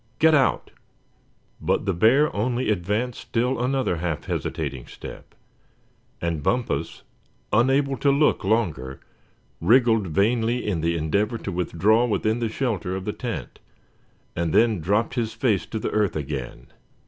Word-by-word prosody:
Get 160 0 +5
out!" 140 -3 +2 0.9
But - - 0
the 95 - +1
bear 120 - +3
only 120 +2 0
advanced 105 +6 -1
still 125 +2 -1
another 130 -8 0
half 80 -2 -3
hesitating 70 -6 -4
step, - - -11 0.8
and 85 -3 -2
Bumpus, 85 - -1 0.5
unable 135 +4 +3
to 140 - +2
look 140 -2 +3
longer, 85 - -1 0.6
wriggled 115 -4 +4
vainly 115 +7 +1
in 95 -6 -1
the 85 +1 0
endeavor 100 +9 0
to - - -5
withdraw 95 +7 +2
within 110 +1 0
the 115 -2 -1
shelter 110 -7 -2
of 95 0 -5
the 105 - -2
tent, 100 - -6 0.8
and 85 -2 -1
then 110 -4 +4
dropped 100 +9 0
his 115 -3 -2
face 110 -8 0
to 110 - -4
the 110 - -3
earth 105 -3 +1
again. 75 -2 -5
110 Hz, 140 wpm, -24 LUFS, 85-120 Hz, 0.9 s, Get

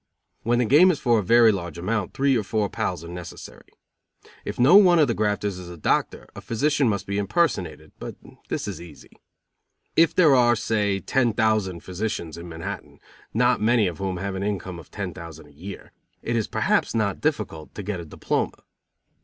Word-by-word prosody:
When 120 +2 +1
the 125 - +2
game 150 - +6
is 165 -5 +1
for 120 -6 +3
a - - -2
very 115 +3 +6
large 85 -5 -5
amount 100 +2 -2
three 135 0 +2
or 115 - +2
four 105 0 -1
pals 80 - -3
are - - -9
necessary. 85 0 -10 0.8
If - - -6
no 135 +9 +6
one 185 -4 +7
of 155 -3 +5
the 120 - +1
grafters 105 -3 -1
is 90 -1 -9
a 90 - -9
doctor, - - -1
a - - -8
physician 140 +2 +1
must 100 -3 -2
be 100 +1 -2
impersonated, 165 - -1
but - - -7 0.3
this - - -3
is - - -6
easy. 85 -4 -13 0.8
If 165 0 +4
there 160 -6 +6
are, 120 -2 +5
say, 105 -4 0
ten 120 -4 +1
thousand 110 -5 0
physicians 90 -4 -4
in 85 +1 -9
Manhattan, 80 0 -7 0.3
not 125 +1 +2
many 110 0 +3
of 90 -4 -3
whom 95 -2 -2
have 100 +2 -3
an 95 - -4
income 95 -3 -3
of - - -14
ten 95 -4 -5
thousand 85 -3 -10
a - - -20
year, 95 +7 -10 0.3
it 115 - -1
is 110 -2 0
perhaps - - 0
not 100 -4 0
difficult 105 - -3
to 105 - -6
get 100 -2 -3
a 85 - -7
diploma. 75 - -3
105 Hz, 195 wpm, -24 LUFS, 90-120 Hz, 0.8 s, one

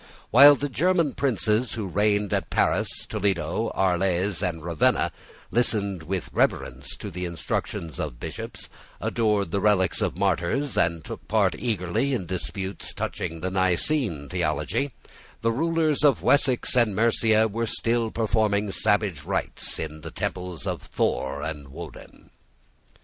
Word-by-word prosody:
While 140 +5 +9
the 145 +1 -3
German 165 +2 +1
princes 115 -3 0
who 110 -3 -3
reigned 105 +2 +1
at 95 -5 -1
Paris, - - +2 0.2
Toledo, 95 +2 -1
Arles, 95 0 +1
and 85 -4 -2
Ravenna 85 -2 +2 0.4
listened 100 -6 0
with 90 +2 -4
reverence 65 +3 -1
to 100 - -7
the 90 +1 -4
instructions 85 -3 -4
of - - -4
bishops, - - -7 0.3
adored 105 -6 0
the 100 - 0
relics 100 -3 +2
of - - -1
martyrs, 135 +11 0
and 85 -1 +1
took - - -8
part - - +2
eagerly 115 +4 -1
in 95 - -3
disputes 95 +1 -5
touching 80 0 -4
the 95 +1 -2
Nicene 95 - +1
theology, 140 - -1 0.5
the 115 - +2
rulers 160 +3 +1
of 145 -3 +4
Wessex 130 -4 +3
and 115 -5 +3
Mercia 110 0 +3
were 115 +2 -2
still 115 0 0
performing 105 -2 +1
savage 105 -7 +1
rites - - -1
in 80 -1 -5
the 80 - -7
temples 90 +1 -4
of - - -3
Thor 70 +2 -1
and 75 -3 -5
Woden. 70 - -11
100 Hz, 140 wpm, -25 LUFS, 85-115 Hz, 0.5 s, While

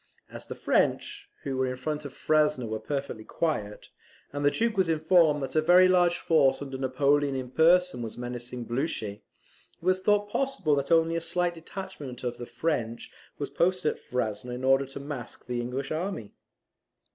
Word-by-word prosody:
As - - -8
the - - -6
French, 410 -1 0
who 135 -2 -3
were 130 0 +1
in 130 - -2
front 150 +3 -4
of 140 - -6
Frasne, 150 -4 +1
were 110 0 -3
perfectly 135 -6 -4
quiet, 110 -9 -3 0.4
and 145 0 -3
the 145 - +6
Duke 230 +8 0
was 190 -3 +2
informed 160 -2 +4
that 135 - -5
a 155 - +5
very 180 +3 +6
large 175 -1 +4
force 150 -5 +3
under 135 -2 -6
Napoleon 140 +2 +2
in 130 -1 -4
person 170 -2 +4
was 115 -2 -6
menacing 120 0 -5
Blucher, 120 -4 -2
it - - -33 0.6
was 185 +2 +1
thought 205 +1 +2
possible 270 - 0
that 140 +2 0
only 165 0 +4
a 165 - -1
slight 175 +1 0
detachment 165 -7 -8
of 120 -1 -3
the 120 - -6
French 120 -3 -2 0.3
was - - -4
posted 180 -3 +1
at - - -18
Frasne 125 -2 -3
in 125 +1 -5
order 135 +1 +3
to 135 - -8
mask 140 -4 -7
the 120 -1 -2
English 130 +3 -4
army. 155 - -3
145 Hz, 180 wpm, -28 LUFS, 125-170 Hz, 0.6 s, the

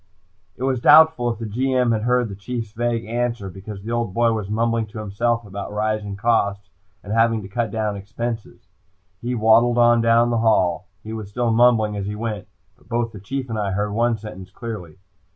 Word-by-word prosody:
It 125 - -6
was 130 -2 0
doubtful 150 -5 +6
if 115 - -5
the 115 - -5
G.M. 125 +2 +1
heard 120 +2 +1
the 100 - -7
Chief's 115 +2 -5
vague 115 +1 -1
answer, 115 -3 -2
because 95 +1 -9
the 115 - -5
old 120 -5 -2
boy 115 -1 +3
was 105 -3 -4
mumbling 115 +1 0
to 105 - -11
himself 115 +3 -1
about 100 0 -6
rising 105 -1 -2
costs 100 -2 0 0.3
and 100 - -5
having 115 -1 +2
to - - -7
cut 115 +3 -2
down 105 -1 -2
expenses. 115 +3 -6 0.6
He 125 +1 -2
waddled 115 +2 +4
on 120 -1 +5
down 115 +1 +4
the 115 - +1
hall. 95 -5 +2 0.2
He 110 - -7
was 110 -3 -6
still 120 +2 0
mumbling 110 -2 +4
as 100 -1 -3
he 105 - -4
went, 105 -2 -4 0.3
but - - -26
both 120 -1 -1
the 105 - -10
Chief 130 +6 -4
and 110 -2 -3
I 100 -2 -1
heard 105 +2 -1
one 115 +2 +1
sentence 95 -3 -9
clearly. 100 -6 -7
115 Hz, 200 wpm, -22 LUFS, 105-120 Hz, 0.6 s, doubtful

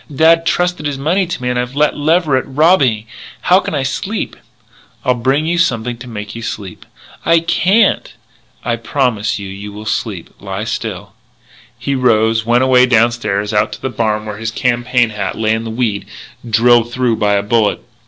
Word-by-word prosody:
"Dad 165 +3 +4
trusted 175 -3 0
his 145 -2 -3
money 175 +7 +1
to 170 - -5
me 125 - 0
and 125 - -1
I've 125 +2 -4
let 150 +1 +2
Leverett 155 -2 +2
rob 160 +7 +4
me. 110 -5 +1 0.4
How 180 +1 +4
can 180 - -4
I 140 - 0
sleep?" 190 +11 -3 0.7
"I'll 125 - +4
bring 135 +5 0
you 170 +1 0
something 120 -7 0
to 125 +1 -10
make 105 -3 -7
you 115 - -7
sleep." 100 -5 -7 0.4
"I 165 0 +4
can't!" 190 +5 +2 0.5
"I 120 -1 0
promise 115 -4 -1
you 100 -1 -6
you 100 +2 -8
will 105 +1 -9
sleep. 105 -4 -3
Lie 100 +1 -5
still." 110 -4 -5 0.6
He 140 - -2
rose, 110 -3 +2
went 120 +2 +3
away 130 -1 +5
downstairs 110 -3 +1
and 105 - +4
out 105 - -4
to - - -9
the 130 - -1
barn, 110 -1 -1
where 105 -1 -6
his 110 +1 -3
campaign 120 +1 +1
hat 105 -1 -4
lay 110 0 +1
in 110 +1 -2
the - - -4
weed, 110 -4 -2 0.4
drilled 120 +1 +4
through 125 -2 0
by 105 -1 +2
a 100 0 +1
bullet. 105 0 +1
120 Hz, 190 wpm, -16 LUFS, 110-140 Hz, 0.7 s, away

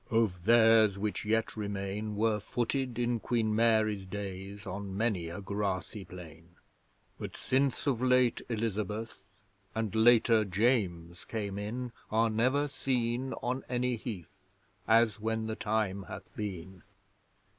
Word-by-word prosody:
'Of 105 -6 +1
theirs 110 -3 +6
which 105 +1 -2
yet 110 +1 +1
remain, 105 0 -3
Were 110 0 +2
footed 120 +3 -2
in 120 -1 0
Queen 110 -2 0
Mary's 110 -3 +2
days 100 +1 -6
On 100 0 -5
many 100 -7 0
a 90 +4 -6
grassy 100 0 -3
plain, 85 -1 -12 0.6
But - - -6
since 135 +1 +1
of 130 -5 +1
late 125 -2 +3
Elizabeth, 110 -1 -2 0.6
And, 110 -2 -1
later, 115 0 +5
James 90 -5 0
came 100 -2 -3
in, 120 +4 -4 0.2
Are 115 +1 +2
never 130 +6 +2
seen 130 -2 -1
on 130 +2 -1
any 125 0 0
heath 105 -4 -7 0.5
As 115 -1 +4
when 110 +1 -1
the 110 0 -3
time 105 -3 -1
hath - - -9
been.' 95 -3 -6
110 Hz, 130 wpm, -31 LUFS, 100-115 Hz, 0.6 s, theirs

